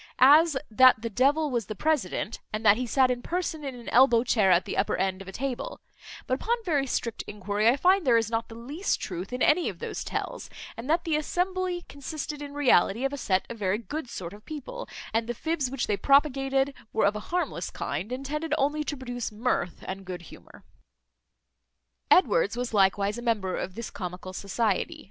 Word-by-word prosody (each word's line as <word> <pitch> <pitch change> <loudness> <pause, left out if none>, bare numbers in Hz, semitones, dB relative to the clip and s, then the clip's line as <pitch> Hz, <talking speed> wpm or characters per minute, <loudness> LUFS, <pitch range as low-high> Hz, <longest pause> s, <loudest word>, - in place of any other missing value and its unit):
As, 295 +3 +6
that 250 0 +6
the 230 - -3
devil 285 +6 +2
was 235 -6 -1
the 215 - -5
president; 240 - -1
and 215 +1 -4
that 205 - +8
he 250 +2 -3
sat 260 +1 +3
in 245 -1 -2
person 330 0 -3
in 270 -2 -5
an 240 -1 -12
elbow 240 -2 +5
chair 220 -6 +3
at 180 0 +4
the - - -4
upper - - +1
end 190 0 -1
of 195 - -10
the - - -6
table; 275 - -4 0.5
but, - - -2
upon 470 - +1
very 290 -6 +1
strict 230 -2 -2
enquiry, 210 +2 +1
I 255 - +3
find 370 +5 +4
there 245 -5 +4
is 225 -1 0
not 225 0 -1
the 225 - -10
least 285 - -2
truth 180 +2 -5
in 250 0 -1
any 335 +3 +3
of - - -8
those - - -5
tales, - - -4 0.3
and 235 +5 -7
that 330 +2 +2
the 325 -4 +1
assembly 360 +2 -1
consisted 295 +1 -6
in 285 0 -7
reality 250 -4 +3
of 275 - -1
a - - -1
set 190 -7 0
of 235 - -8
very 195 0 +1
good 250 +5 -6
sort 175 -4 -6
of 210 +1 -13
people, 300 -4 -7 0.2
and 225 0 +1
the 240 - -3
fibs 315 -1 -1
which 270 -1 -2
they 205 - 0
propagated 275 0 +3 0.2
were 220 - +2
of 200 +1 +2
a - - -3
harmless 340 - -2
kind, 170 +11 -4
and 260 +2 -4
tended 300 +2 -1
only 295 +2 +1
to 290 -1 -4
produce 245 -3 -5
mirth 210 -5 -2
and 190 +1 -6
good 180 -1 -6
humour. - - -15 1.5
Edwards 450 - +4
was 245 -1 -3
likewise 200 +2 +2
a - - -6
member 210 -6 0
of 185 - -4
this 230 -1 -6
comical 180 -1 -6
society. 225 - -1
250 Hz, 210 wpm, -27 LUFS, 210-295 Hz, 1.5 s, that